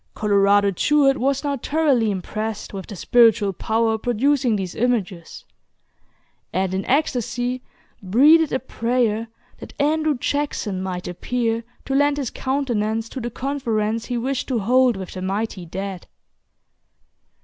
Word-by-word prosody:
Colorado 200 -1 +3
Jewett 275 - +3
was 275 +2 0
now 285 -1 -1
thoroughly 275 -5 +1
impressed 210 +3 -4
with 195 -1 -6
the 205 - -8
spiritual 225 0 +4
power 220 +3 0
producing 245 +1 +1
these 190 -3 -3
images; 210 -8 -2 1.1
and 185 0 -1
in 190 +1 -1
ecstasy 250 -3 0 0.4
breathed 290 - +5
a - - +1
prayer 230 -3 -1 0.3
that - - -12
Andrew 305 0 +1
Jackson 245 -8 -2
might 185 -1 -4
appear 230 +5 -2 0.2
to 270 - -3
lend 285 +1 +3
his 270 -5 -3
countenance 230 -5 -1
to 265 - -6
the 240 - -3
conference 230 -4 -2
he 245 - -3
wished 260 +2 -2
to 255 - 0
hold 245 +2 +3
with 190 -1 -7
the 185 - -6
mighty 195 -1 -3
dead. 190 +1 -6
230 Hz, 135 wpm, -22 LUFS, 200-265 Hz, 1.1 s, breathed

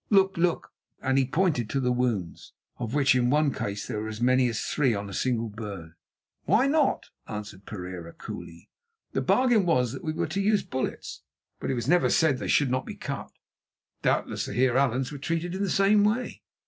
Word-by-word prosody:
Look, 195 -2 +4
look!" 170 0 0 0.3
and 130 0 0
he 130 - +1
pointed 145 - +1
to 135 - 0
the 125 -1 +1
wounds, 120 -8 -2 0.3
of 120 +1 -3
which 140 -3 +4
in 125 -1 +2
one 145 0 +3
case 100 0 -4
there 105 - -3
were 110 - -4
as 110 0 -6
many 125 +1 +4
as 115 -2 -2
three 130 -4 +1
on 100 0 -4
a 100 - -8
single 115 -1 0
bird. 100 -6 -7 0.5
"Why 215 - +4
not?" 290 0 +1 0.2
answered 105 -2 -7
Pereira 90 -4 -7
coolly. 85 0 -9 0.4
"The - - -1
bargain 245 -5 +3
was 125 -9 +2
that 135 - -7
we 155 - -1
were 160 - -1
to 195 - -2
use 210 +1 +2
bullets, 130 0 -4 0.4
but - - -4
it 130 - +1
was 120 0 -3
never 175 +3 +4
said 155 -5 +3
that - - -10
they - - -4
should 140 -4 +3
not 130 0 -1
be - - -6
cut. - - -5 0.7
Doubtless - - 0
the - - -5
Heer 125 -1 +2
Allan's 130 -1 +1
were 145 - -7
treated 165 +4 -2
in 190 - -3
the 200 - 0
same 200 +3 +4
way." 220 +4 0
130 Hz, 210 wpm, -27 LUFS, 110-175 Hz, 0.7 s, Look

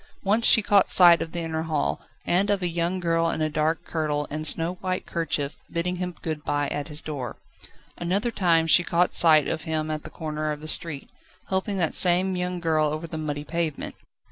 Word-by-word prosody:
Once 215 +4 +2
she 220 - +5
caught 200 -1 +3
sight 175 -2 +7
of 165 - -5
the 170 - -4
inner 160 -1 -3
hall, 150 - -2 0.2
and 190 +4 +1
of 200 -2 0
a - - +1
young 170 +2 -2
girl 165 -1 0
in - - -3
a 155 0 -1
dark 155 +2 -1
kirtle 150 -2 -2
and 155 +1 -3
snow 170 +4 +1
white 185 -1 -3
kerchief 150 -4 -3
bidding 180 +2 -2
him 180 -1 -5
good 155 -2 -4
bye 145 0 -1
at 145 0 -4
his 150 -1 +2
door. 135 -6 -6 0.6
Another 195 +7 -1
time 170 -6 +1
she 170 +2 +4
caught 175 +1 0
sight 155 -3 +5
of 155 - -4
him 155 -1 -3
at 155 -1 -4
the - - -9
corner 155 -2 -4
of 150 - -5
the 155 - -9
street, 155 -3 -1 0.4
helping 190 +1 -2
that 170 -4 0
same 185 +1 +6
young 180 0 -3
girl 160 -2 +1
over 155 +2 -4
the 165 - -8
muddy 145 -2 -4
pavement. 160 -1 -4
165 Hz, 210 wpm, -24 LUFS, 155-180 Hz, 0.6 s, sight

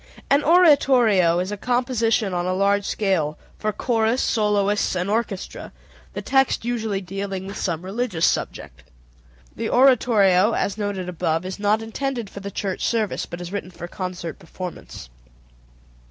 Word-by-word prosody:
An 285 +1 +4
oratorio 255 - +5
is 185 +3 -2
a 205 - -4
composition 235 -3 0
on 175 0 -1
a 185 - 0
large 200 +1 +2
scale 175 -8 0 0.2
for 215 - 0
chorus, 225 +2 0
soloists, 210 -3 +1
and 180 +2 -1
orchestra, 215 -4 -3 0.4
the - - -5
text 270 -3 +2
usually 220 -5 -2
dealing 195 0 -5
with 200 +1 -7
some 170 -1 -3
religious 195 -4 -1
subject. - - -3 0.7
The - - -3
oratorio, 225 -6 +4
as 200 - -1
noted 205 -3 -3
above, 165 -1 -1
is 185 +2 -6
not 210 +2 +1
intended 235 -1 -4
for - - -8
the 200 0 -6
church 195 -1 -4
service, 220 -4 -1
but 175 +1 -7
is 175 0 -7
written 205 -2 -4
for 175 -1 -8
concert 180 -3 -6
performance. 170 - -9
200 Hz, 150 wpm, -22 LUFS, 185-230 Hz, 0.7 s, oratorio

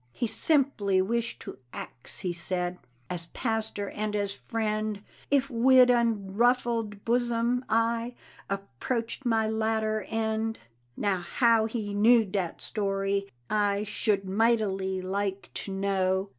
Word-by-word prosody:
He 240 - -1
simply 225 -5 +2
wished 230 +5 -1
to - - -8
ax, 125 - -7
he 180 -3 -1
said, 180 +1 -3 0.3
As 170 +1 -4
pastor 220 -2 -2
and 210 0 -2
as 200 -1 -1
friend, 215 -1 -2 0.3
If 275 -1 +3
wid 250 +1 +6
unruffled 230 -1 +1
bosom 240 +1 +1
I 230 +2 +1 0.3
Approached 225 - -3
my 225 -2 +2
latter 220 0 0
end. 225 0 -1 0.4
Now 200 -3 +1
how 225 +4 +3
he 215 -3 -4
knew 225 +2 +5
dat 185 -3 -3
story 195 -1 -1 0.2
I 205 -1 +1
Should 210 -2 0
mightily 195 -3 +1
like 195 +1 -2
to 195 - -6
know. 190 0 0
215 Hz, 120 wpm, -28 LUFS, 195-230 Hz, 0.4 s, wid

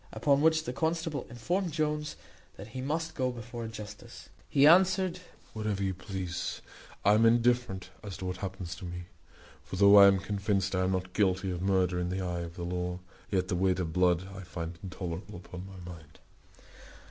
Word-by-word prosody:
Upon 140 -1 +2
which 160 0 +4
the 125 - -4
constable 160 -1 -1
informed 175 - -1
Jones 150 -1 -1 0.4
that 100 +3 -9
he 130 +3 -5
must 160 +4 -2
go 130 -1 0
before 120 0 -7
a - - -4
justice. 105 -2 -9 0.2
He 140 - +5
answered, 185 +2 +5 0.3
"Wherever 105 -2 -2
you 95 -1 0
please; 95 -2 -4 0.4
I 105 - +7
am 110 +2 +4
indifferent 115 -5 +2
as 100 -3 -6
to 95 - -6
what 90 0 -3
happens 95 -2 -5
to 95 - -8
me; 90 0 -6 0.6
for - - -7
though 100 +2 +7
I 100 0 +10
am 100 -1 +5
convinced 100 -1 -1
I 90 0 +2
am 95 - +1
not 90 0 -3
guilty 95 -2 +1
of 90 -1 -4
murder 95 -2 +2
in 90 0 -1
the 95 +1 -2
eye 90 -1 -2
of 85 0 -6
the 85 - -5
law, 90 0 -2 0.3
yet 90 -2 0
the 95 - -1
weight 95 0 +2
of 80 -3 -2
blood 90 0 +2
I 95 - -7
find 85 -2 -6
intolerable 90 -1 -6
upon 90 +1 -9
my 90 -2 -9
mind." 80 -2 -15
95 Hz, 195 wpm, -30 LUFS, 90-120 Hz, 0.6 s, I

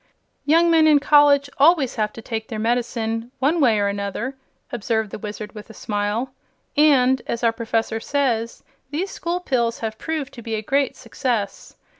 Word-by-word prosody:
"Young 335 +3 +4
men 320 -1 +5
in 300 -2 +6
college 285 -1 +5
always 285 -3 +4
have 215 -3 -1
to 225 - -10
take 220 -1 -4
their 220 - -5
medicine, 230 0 -1
one 305 +5 +1
way 230 -6 +4
or 200 - +1
another," 200 +6 -3 0.4
observed 220 -2 -1
the - - -6
Wizard, 210 0 -7
with 210 +1 -10
a 220 - -12
smile; 210 +5 -2 0.4
"and, 265 -4 +4
as 235 - -3
our 230 -1 +3
Professor 225 -1 -1
says, 235 -4 -1 0.3
these 340 +7 -3
School 345 +1 -3
Pills 240 -8 -1
have 220 -1 -4
proved 310 -4 -4
to 240 - -10
be 225 -1 -3
a 215 - -4
great 275 +4 0
success. 230 -4 -3
235 Hz, 175 wpm, -22 LUFS, 220-285 Hz, 0.4 s, in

